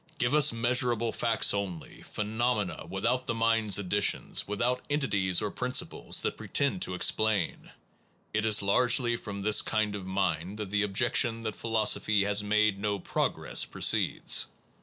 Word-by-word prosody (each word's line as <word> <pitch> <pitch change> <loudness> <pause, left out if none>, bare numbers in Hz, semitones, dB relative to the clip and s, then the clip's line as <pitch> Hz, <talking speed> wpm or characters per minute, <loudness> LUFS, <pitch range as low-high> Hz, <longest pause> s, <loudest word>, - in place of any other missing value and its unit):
Give 125 +2 0
us 150 -1 +5
measurable 120 0 +1
facts 115 -1 +2
only, 95 -5 -5
phenomena, 110 -1 -3
without 115 +7 -1
the 115 - -1
mind 115 -1 +1
s 100 - +4
additions, 100 +1 -1
without 120 +5 -1
entities 100 - 0
or 105 - -2
principles 125 0 -1
that - - -2
pretend 140 +6 -1
to 90 - 0
explain. 105 -1 0 0.6
It 105 0 0
is 110 -2 +3
largely 120 +3 +2
from 100 -3 -7
this 105 +1 +5
kind 110 -2 -1
of 100 -3 -7
mind 95 0 -2
that 105 -3 -6
the 105 0 +1
objec 105 +4 0
tion 115 -3 +1
that 110 -2 -4
philosophy 110 -2 +1
has 100 0 0
made 105 -1 +1
no 100 0 -1
progress, 95 - -1
proceeds. - - +1
105 Hz, 155 wpm, -28 LUFS, 100-120 Hz, 0.6 s, us